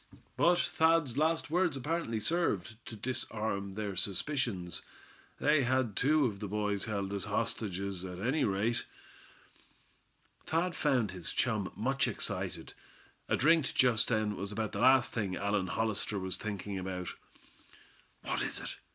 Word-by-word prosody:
But 175 +1 +4
Thad's 160 -6 +2
last 160 +1 +2
words 175 -4 +2
apparently 140 -4 -1
served 110 - 0
to 115 - -6
disarm 105 -4 -3
their 105 -2 -3
suspicions. 100 - -1 0.6
They 150 0 +4
had 130 -4 +1
two 150 +2 +3
of 105 -5 -2
the 105 - -4
boys 105 -1 0
held 100 -3 -2
as 100 - -1
hostages, 95 -2 -2
at 90 -1 -6
any 130 - +1
rate. 110 +4 +1 1.6
Thad 170 +2 +1
found 125 -9 +2
his 90 -3 -2
chum - - 0
much - - +1
excited. - - -3 0.6
A - - +3
drink 160 -1 +3
just 125 -4 +4
then 110 -3 +1
was 100 +1 -5
about 110 0 -2
the - - -4
last 130 0 +5
thing 100 -5 -1
Allan 100 -1 0
Hollister 110 0 -1
was 95 -1 -1
thinking 100 -2 -4
about. 90 -1 -4 1.1
"What - - -1
is - - -1
it?" - - -6
110 Hz, 145 wpm, -32 LUFS, 100-135 Hz, 1.6 s, last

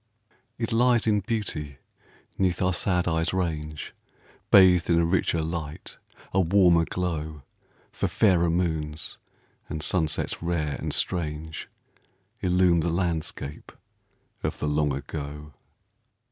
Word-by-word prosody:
It 115 0 -2
lies 120 0 +3
in 105 -2 +3
beauty 90 - -3 0.6
'neath 90 -2 +1
our 90 0 +2
sad 90 0 +1
eyes' 80 +1 0
range, 75 -4 -3 0.6
Bathed 90 -3 +6
in 85 - +4
a 85 - +3
richer 85 -2 +1
light, 80 -2 -5 0.4
a 95 - +3
warmer 90 -2 +4
glow; 80 -5 -3 0.5
For - - -1
fairer 90 -5 +3
moons, 80 -3 -2 0.5
and 80 -1 -4
sunsets 80 -1 0
rare 85 -4 -1
and - - -3
strange, 80 -3 -2 0.7
Illume 90 -1 +3
the 85 +2 0
landscape 85 -4 -3 0.7
of - - -2
the - - -2
Long 75 0 +1
Ago. 75 +2 -6
85 Hz, 120 wpm, -26 LUFS, 75-90 Hz, 0.7 s, Bathed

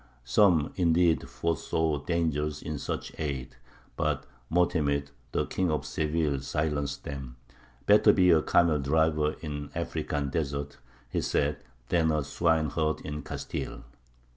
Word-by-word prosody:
Some, 80 - +3
indeed, 85 -2 +3
foresaw 80 -2 0
dangers 75 -2 -1
in 75 -3 -4
such - - -4
aid; 70 -6 -3 0.4
but - - -1 0.3
Mo'temid, 70 -5 +1 0.2
the - - 0
King 95 -2 -1
of 75 -2 -1
Seville, 75 -2 0
silenced 70 0 -2
them: 65 -4 -6 0.5
"Better 105 +1 +7
be 90 -2 +5
a 80 -2 +5
camel 85 -2 +3
driver 75 +1 +2
in 75 -2 -5
African 70 -2 -2
deserts," 70 -1 -2 0.3
he - - -1
said, 75 +1 0 0.3
"than 80 -2 +3
a 75 -1 +1
swineherd 80 0 +1
in 75 0 -5
Castile!" - - -5
75 Hz, 125 wpm, -28 LUFS, 70-80 Hz, 0.5 s, Better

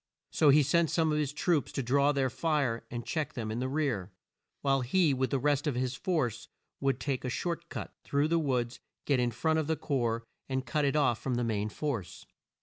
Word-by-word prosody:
So 150 - +4
he 145 +2 +7
sent 165 +3 +3
some 160 -2 +2
of 150 - +1
his 145 -2 0
troops 150 0 +1
to 135 - -1
draw 140 +4 +3
their 135 -3 0
fire 130 -4 0
and 120 -1 -5
check 155 -2 -2
them 110 -3 -4
in 115 - -2
the 130 +1 -1
rear, 130 - -1 0.5
while 135 -1 +2
he 150 +4 +3
with 130 0 0
the 140 - +1
rest 145 +2 +1
of 145 - 0
his 125 0 -1
force 130 - -1 0.3
would 135 -2 +1
take 135 -3 -2
a 125 - -2
short 170 +5 -3
cut, - - -6
through 145 +2 +1
the 170 0 +3
woods, 125 -5 -1 0.3
get 140 -3 +2
in 120 -1 +2
front 160 +7 +1
of 155 - -1
the 160 - +1
corps, 115 -5 -1 0.3
and 130 0 -1
cut 150 0 0
it 140 - +1
off 130 -7 +3
from 130 -2 -1
the 120 - 0
main 110 -2 -1
force. 115 -7 -4
135 Hz, 225 wpm, -30 LUFS, 125-150 Hz, 0.5 s, he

